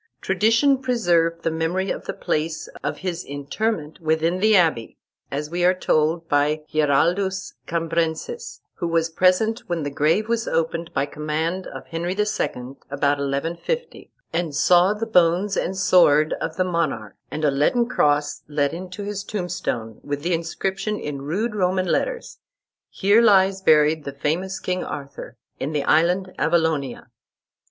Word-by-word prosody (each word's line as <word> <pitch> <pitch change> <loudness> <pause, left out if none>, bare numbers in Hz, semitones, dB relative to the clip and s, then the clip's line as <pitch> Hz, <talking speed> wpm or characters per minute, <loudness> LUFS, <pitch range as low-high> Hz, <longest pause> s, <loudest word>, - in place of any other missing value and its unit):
Tradition 230 +8 +3
preserved 175 -10 +1
the 165 - +1
memory 165 +4 -1
of - - -5
the - - -3
place 160 +1 -2 0.2
of - - -2
his 175 -1 -2
interment 150 +4 -3
within 160 +2 0
the 215 +2 +4
abbey, 160 - +2 0.3
as 150 +2 -4
we 175 +1 -1
are 180 +1 +4
told 165 -1 +1
by 150 +1 +1
Giraldus 175 +6 +1
Cambrensis, 170 - -2 0.2
who 170 - -2
was 165 0 +1
present 185 +7 +2
when 170 -3 -1
the 145 - -3
grave 160 +10 +1
was 230 0 -1
opened 165 +1 -1
by 135 - 0
command 155 +5 -3
of - - -9
Henry 170 +2 -3
II. 210 - +2 0.6
about 140 0 +1
1150, 165 - -3 0.2
and 165 -3 -1
saw 180 +6 +4
the 220 +2 -3
bones 180 -1 +3
and 190 +2 -2
sword 155 -5 +4
of 160 - -3
the 185 - +3
monarch, 165 - -2
and 155 - -2
a 145 - +4
leaden 190 - +2
cross 145 -8 +1
let 145 -1 0
into 185 +3 -7
his 200 -1 -4
tombstone, 175 - -4
with 145 0 -4
the 175 +1 0
inscription 190 +5 -2
in 145 -2 -5
rude 200 +11 -2
Roman 185 -2 +1
letters, 485 - -2 0.5
"Here 205 +4 +3
lies 195 -3 +4
buried 155 -2 +4
the 140 - -5
famous 175 +7 -2
King 180 0 -2
Arthur, 140 -1 -7 0.2
in 145 +4 -3
the 145 -2 0
island 180 +5 +2
Avalonia." 160 -5 0
170 Hz, 150 wpm, -23 LUFS, 150-190 Hz, 0.6 s, the